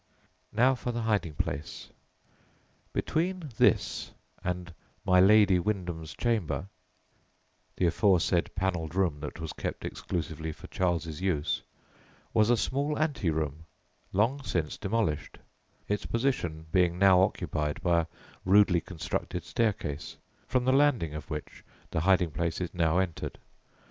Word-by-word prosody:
Now 125 +5 +4
for 125 -1 -3
the 120 -1 -3
hiding 100 -9 0
place. 75 +3 -4 1.0
Between 170 -2 -1
this - - +2 0.3
and 90 0 -3 0.3
"my 90 0 +5
Lady 100 -1 +6
Wyndham's 85 -5 -3
chamber" 95 - 0 1.1
(the 90 - +1
aforesaid 90 0 +3
panelled 90 -4 -1
room 90 -6 +1
that 75 +2 -6
was 80 -1 -5
kept - - -5
exclusively 80 -2 -4
for - - -13
Charles's 85 -3 -1
use) 85 -6 0 0.7
was 110 0 +4
a 120 - +5
small 140 +8 -1
ante 145 - 0
room, 80 0 -2 0.4
long 115 +9 +1
since 85 - -2
demolished, 95 -9 -1 0.5
its 105 0 -1
position 100 - -1
being 90 -1 +3
now 95 -1 +6
occupied 75 -5 -1
by 85 -2 +4
a 85 - -1 0.4
rudely 95 -2 +5
constructed 90 0 -4
staircase, 90 - -2 0.3
from 125 -1 +1
the 130 - +4
landing 135 - +3
of 75 +2 -7
which 75 -2 -6 0.3
the - - 0
hiding 90 0 +3
place 85 +1 -2
is 90 -2 -4
now 85 -1 +2
entered. 90 -4 -2
90 Hz, 130 wpm, -29 LUFS, 80-105 Hz, 1.1 s, Lady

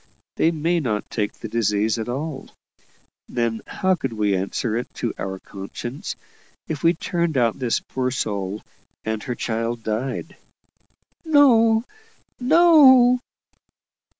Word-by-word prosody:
They 160 - +3
may 165 +2 0
not 110 -8 -3
take 105 -2 -2
the - - -8
disease 110 0 0
at 110 - -4
all. 140 +2 -4 0.8
Then, 115 -2 -1
how 190 0 +1
could 135 -9 -3
we 105 -2 +1
answer 100 +4 -2
it 120 - -3
to - - -2
our 95 0 -4
conscience 100 +7 -7 0.5
if 155 -3 -4
we 170 +1 +3
turned 170 -2 -1
out 115 -3 +1
this 125 -3 0
poor 130 -1 -2
soul, 100 -5 -3 0.4
and 110 -1 -3
HER 125 0 -4
child 115 0 -3
died?" 110 +5 -3 0.9
"No! 235 -8 +5 0.6
no!" 260 -4 +6
125 Hz, 125 wpm, -22 LUFS, 110-175 Hz, 0.9 s, no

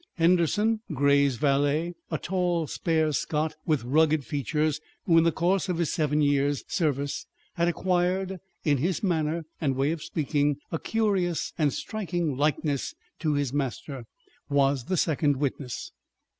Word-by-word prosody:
Henderson, 180 +6 +3
Grey's 140 -1 +3
valet, 145 +5 +1 0.2
a - - -1
tall, 175 -3 0
spare 160 0 0
Scot 150 +2 -1
with 155 -6 +2
rugged 150 +2 +3
features 150 +1 -1 0.2
who 170 - +4
in 165 - +3
the 165 - +4
course 185 +4 +1
of 180 - 0
his 170 -3 0
seven 150 -2 +1
years' 145 -1 +2
service 145 -5 -1 0.3
had 170 0 +1
acquired, 185 +2 0 0.3
in 145 -3 +3
his 175 +7 -1
manner 165 -3 0 0.2
and 135 -4 +1
way 135 +3 +1
of 165 -2 -4
speaking, 145 -2 0
a 165 - -1
curious 195 -6 0
and 150 -4 +2
striking 175 -8 -2
likeness 145 0 0 0.2
to 155 -3 +1
his 140 -3 -1
master, 135 -2 -3 0.4
was 140 -3 +2
the 185 - -1
second 150 -3 +2
witness. 135 -2 -3
155 Hz, 145 wpm, -27 LUFS, 145-175 Hz, 0.4 s, who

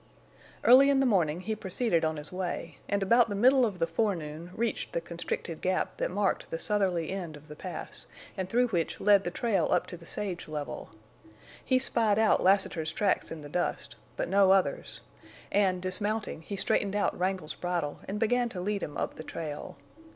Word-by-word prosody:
Early 265 +3 +8
in 275 -1 +4
the 270 - +3
morning 175 -8 +2
he 215 +4 -2
proceeded 190 -3 0
on 160 0 0
his 150 +1 -7
way, 175 -4 -4
and 200 -1 +1
about 230 +4 +4
the 205 - -2
middle 255 +4 +5
of 200 -4 -6
the 165 - +1
forenoon 165 -3 -2
reached 230 0 -2
the - - +1
constricted 170 -1 -5
gap 185 0 -1
that - - -1
marked 200 +1 0
the 165 - -3
southerly 185 -4 0
end 175 -6 -5
of 150 +1 -17
the 150 - -9
Pass, 180 +4 -8 0.3
and 185 -2 -3
through 245 +3 +2
which 170 -6 -1
led 200 -1 +5
the 175 - -2
trail 195 -2 0
up 180 - +2
to 175 - -8
the 170 0 -15
sage 195 -4 -4
level. 150 -2 -5 0.7
He 260 - +3
spied 225 -5 +1
out 220 0 +4
Lassiter's 185 -4 +2
tracks 200 +2 0
in 160 -2 -7
the - - -7
dust, 175 +4 -2 0.2
but - - -1
no 195 +1 +4
others, 190 -1 +1 0.5
and 190 -3 +2
dismounting, 205 0 -1
he 200 +5 -6
straightened 200 +1 +1
out 205 - +1
Wrangle's 180 -4 -2
bridle 175 -5 -3
and 205 +2 -3
began 240 +2 +2
to 190 - -6
lead 200 +2 -1
him 145 - -5
up - - -3
the 155 - -7
trail. 150 -2 -6
190 Hz, 195 wpm, -29 LUFS, 165-210 Hz, 0.7 s, Early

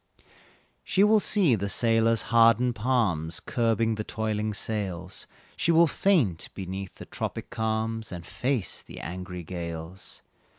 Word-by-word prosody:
She 195 - +2
will 215 +1 +5
see 195 - +3
the 100 -2 -1
sailor's 115 0 +2
hardened 115 +2 +5
palms 105 -9 0
Curbing 115 -1 +1
the 110 0 -3
toiling 110 0 -2
sails, 100 -4 -4 0.3
She 170 - +1
will 165 +1 +6
faint 150 - +1
beneath 95 0 -6
the - - -10
tropic - - -5
calms 110 0 -2
And 85 -2 -7
face 120 +4 -1
the - - -11
angry 90 0 -6
gales. 85 +1 -7
110 Hz, 130 wpm, -27 LUFS, 95-115 Hz, 0.3 s, will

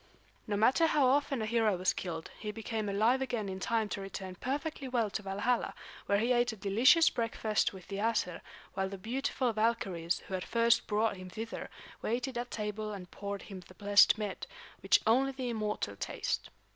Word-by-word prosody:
No 205 -1 0
matter 260 +10 +4
how 295 -3 +3
often 275 -2 +2
a - - -1
hero 220 -3 +2
was 185 +1 +2
killed, 165 -3 -5
he 210 - -5
became 220 -1 -3
alive 225 +6 +3
again 240 -6 -2
in 190 0 -5
time 225 +2 0
to 200 - -4
return 195 -1 -6
perfectly 275 - -3
well 235 -5 0
to 220 - -3
Valhalla, 205 +5 -1 0.3
where 200 - +3
he 230 +4 +1
ate 240 0 +3
a - - -7
delicious 235 - +5
breakfast 225 -2 0
with 190 -3 -12
the 195 0 -5
Æsir; 210 -5 0 0.3
while 190 0 -1
the 195 - -6
beautiful 250 +3 -1
Valkyries 195 -7 0
who - - -7
had 185 -1 -1
first 235 0 +3
brought 215 -1 +1
him 185 0 -9
thither 225 +5 -6 0.3
waited 245 +3 -2
at 240 +1 -3
table 215 0 -3
and 185 -3 -8
poured 200 0 -5
the 185 -2 -11
blessed 205 +1 +6
mead, 210 -3 -4 0.3
which - - +4
only 265 +5 +3
the 255 -2 -3
immortal 210 - -2
taste. - - -3
215 Hz, 185 wpm, -32 LUFS, 195-240 Hz, 0.3 s, blessed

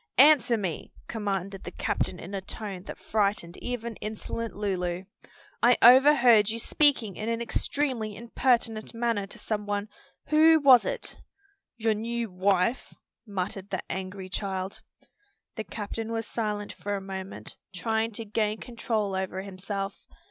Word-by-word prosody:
"Answer 270 -3 +6
me!" 185 -7 -4 0.2
commanded 195 -3 -3
the - - -5
captain 180 - -2
in 190 - -8
a 195 - -2
tone 195 -1 -6
that - - -7
frightened 200 -5 0
even 235 -2 -4
insolent 220 +1 -5
Lulu. 185 -3 -2 0.6
"I 245 +1 +6
overheard 250 -4 +7
you 225 - -2
speaking 240 - +2
in 215 - -3
an 230 0 0
extremely 235 -2 -1
impertinent 235 -1 0
manner 230 -4 0
to - - -8
some 210 -2 -3
one. 205 +1 -2 0.4
Who 315 +1 +6
was 265 -4 +7
it?" - - -5 0.6
"Your 225 -1 +2
new 230 0 -3
wife," 190 +5 +1 0.3
muttered 195 0 -4
the 190 - -3
angry 190 0 -5
child. 190 0 -4 0.7
The 220 - -4
captain 220 +3 -5
was 225 -1 -2
silent 210 -2 -3
for 205 0 -3
a - - -2
moment, 190 0 -7
trying 220 +4 -1
to 225 +2 -4
gain 215 0 0
control 225 -4 -2
over 190 0 -3
himself. 195 +1 -5
215 Hz, 140 wpm, -28 LUFS, 195-230 Hz, 0.7 s, overheard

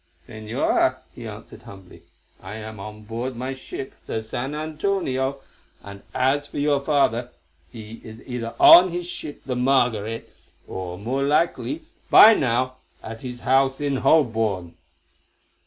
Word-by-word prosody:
"Señora," 110 0 0 0.2
he - - -9
answered - - -11
humbly, 95 -2 -14 0.4
"I 95 +3 -8
am 110 -1 -8
on 105 +1 -9
board 120 +4 -5
my 130 +3 -4
ship, 130 0 -8
the 110 - -3
San 125 +6 -4
Antonio, 150 -4 -2 0.4
and 100 0 -10
as 140 +3 +1
for - - -9
your 145 -1 +1
father, 130 -5 +1 0.4
he 110 +1 -10
is 110 0 -11
either 120 -2 -5
on 180 +2 +9
his 175 0 -4
ship, 160 -4 -7
the 130 - -2
Margaret, 120 -4 0 0.3
or 90 -1 -6
more 125 +7 -2
likely, 170 - 0 0.3
by 225 - +9
now, 130 - 0 0.3
at 115 0 -8
his 125 -1 -7
house 135 +1 +2
in 140 -2 -1
Holborn." 110 - +1
125 Hz, 140 wpm, -23 LUFS, 110-140 Hz, 0.4 s, on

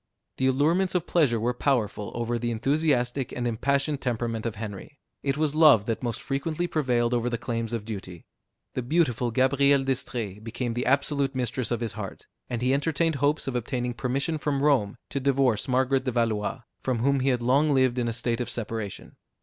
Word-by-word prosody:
The 130 - +2
allurements 165 +8 +2
of 175 -2 +1
pleasure 140 -10 +2
were 120 +3 0
powerful 115 -6 0
over 120 0 -1
the 120 +1 -1
enthusiastic 130 +1 0
and 120 - -3
impassioned 140 +5 0
temperament 115 -2 -2
of 115 - -4
Henry; 110 +7 -7 0.2
it 140 0 -1
was 155 -2 +1
love 150 -9 +6
that 115 -1 -2
most 120 -2 -3
frequently 155 +5 -2
prevailed 125 -8 +1
over 120 0 +1
the 120 - -2
claims 115 -1 -3
of 115 -3 -3
duty. 95 -6 -7 0.5
The - - -2
beautiful 125 -3 +1
Gabrielle 135 +3 +3
d'Estrées 120 -6 -3
became 120 +1 -3
the 120 +1 -2
absolute 140 0 +1
mistress 125 -1 -1
of 120 -1 -1
his 115 -3 -1
heart; 100 -2 -7 0.2
and 120 -1 -3
he 130 +1 +3
entertained 160 +2 +1
hopes 145 +3 +1
of 135 - -2
obtaining 125 0 -2
permission 140 +6 -1
from 140 -1 -1
Rome 130 -9 +2
to 140 - -1
divorce 135 -4 +2
Margaret 130 +1 +2
de 130 - 0
Valois, 115 0 0 0.2
from 130 -2 -1
whom 140 +4 +2
he 130 +1 +1
had 125 -2 0
long 140 +5 +3
lived 130 -2 +3
in 120 - 0
a 115 - -1
state 120 +1 -1
of 120 - -3
separation. 110 -4 -5
125 Hz, 190 wpm, -26 LUFS, 115-140 Hz, 0.5 s, love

